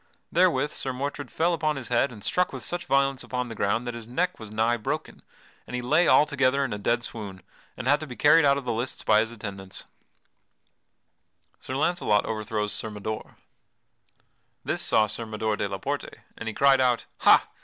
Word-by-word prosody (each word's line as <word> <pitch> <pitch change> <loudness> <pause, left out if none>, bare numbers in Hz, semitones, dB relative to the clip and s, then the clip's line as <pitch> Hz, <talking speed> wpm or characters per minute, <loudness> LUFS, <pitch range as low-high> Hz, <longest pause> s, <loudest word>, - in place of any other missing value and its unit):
Therewith 165 -5 +3
Sir 130 - -3
Mordred 140 0 -4
fell 170 +2 +1
upon 155 -2 0
his 135 -3 -6
head 125 +2 +2
and 105 -4 -11
struck 180 - +1
with - - -7
such 175 0 -4
violence 135 -1 +2
upon 125 -1 -3
the - - -5
ground 110 +3 0
that 120 - -3
his 115 -1 -8
neck 180 +9 -1
was 110 -2 -8
nigh 110 +3 +1
broken, 110 - -4 0.5
and - - -5
he 125 - -2
lay 165 +8 +3
altogether 140 -2 +4
in 120 - -3
a 105 - -4
dead 120 +3 0
swoon 100 -6 -5 0.3
and 125 - -5
had 145 +2 +4
to 155 - -6
be 125 - -8
carried 155 +4 +6
out 140 -1 +4
of 140 - -5
the 120 - -1
lists 120 +4 -3
by 105 - +5
his 110 +1 0
attendants. 100 -4 -7 1.7
[Sidenote: - - -26
Sir 130 - -4
Launcelot 140 - +2
overthrows 105 -1 -2
Sir 110 +1 -3
Mador] 110 +1 -6 1.3
This - - -1
saw 110 - +3
Sir 110 +2 -3
Mador 110 0 -1
de 100 -1 -2
la 95 - -3
Porte, - - -4 0.2
and 115 - -7
he 110 - -2
cried 135 -1 +5
out: 125 -2 +2
"Ha! - - +6
120 Hz, 200 wpm, -26 LUFS, 110-140 Hz, 1.7 s, carried